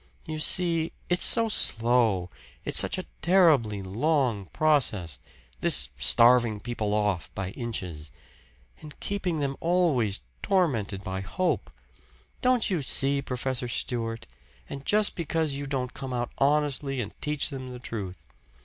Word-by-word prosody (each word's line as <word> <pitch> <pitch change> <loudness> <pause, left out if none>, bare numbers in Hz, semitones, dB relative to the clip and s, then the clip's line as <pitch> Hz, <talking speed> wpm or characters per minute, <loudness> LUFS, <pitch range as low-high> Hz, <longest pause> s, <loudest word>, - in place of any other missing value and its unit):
You 155 -2 -6
see, 165 0 +3 0.2
it's 175 0 +5
so 230 -1 +7
slow 115 - +2 0.3
it's - - +6
such - - +1
a - - -5 0.2
terribly 150 - +3
long 120 +1 -1
process 105 - 0 0.4
this 65 0 +1
starving 115 - +4
people 105 -2 -3
off 105 -6 -1
by 95 -1 -4
inches. 95 - -6 0.7
And 150 -1 -12
keeping 180 -6 -3
them 140 -1 -2
always 160 - 0 0.2
tormented 130 - -1
by 95 -2 -5
hope. 175 - -2 0.7
Don't 250 -3 +2
you 180 -6 -1
see, 140 +1 +2
Professor 125 -1 -3
Stewart? 115 -2 -3 0.4
And 140 0 -9
just 210 0 +2
because 160 -3 -2
you 140 +1 -5
don't 130 -2 -4
come 135 -2 -7
out 120 -1 -3
honestly 140 -1 0
and 105 -4 -5
teach 150 0 -1
them 130 -2 -7
the 125 - -8
truth. 105 -7 -8
130 Hz, 135 wpm, -26 LUFS, 105-155 Hz, 0.7 s, so